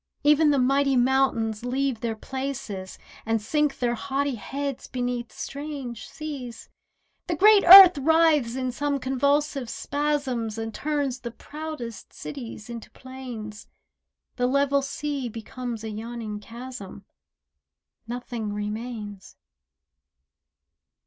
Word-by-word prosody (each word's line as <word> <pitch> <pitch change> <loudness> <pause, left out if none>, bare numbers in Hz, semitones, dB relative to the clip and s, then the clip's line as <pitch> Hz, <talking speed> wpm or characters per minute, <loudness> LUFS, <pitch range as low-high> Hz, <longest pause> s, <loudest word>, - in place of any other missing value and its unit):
Even 300 +1 +5
the 285 - +3
mighty 275 +1 +3
mountains 245 -4 +2
leave 260 -1 -1
their 225 -1 -2
places, 260 -6 -5 0.3
And 225 0 0
sink 295 +6 0
their 240 -1 0
haughty 275 +3 -1
heads 275 +4 -4
beneath 245 -2 -3
strange 280 -5 -6
seas 280 -6 -7 0.6
The 345 - 0
great 415 +4 +6
earth 365 -3 +12
writhes 305 -5 +3
in 255 -1 -1
some 285 +3 -1
convulsive 275 0 0
spasms 280 -7 -2
And 225 0 -4
turns 285 -3 -1
the 240 - -5
proudest 295 -3 -8
cities 240 -5 -8
into 235 -2 -8
plains. 245 -5 -9 0.7
The 250 0 +2
level 280 +1 +2
sea 275 -1 -3
becomes 230 +1 -6
a 220 - -4
yawning 220 -1 -5
chasm— 230 -3 -9 1.0
Nothing 235 -3 -4
remains. 210 -1 -6
255 Hz, 110 wpm, -25 LUFS, 230-280 Hz, 1.0 s, earth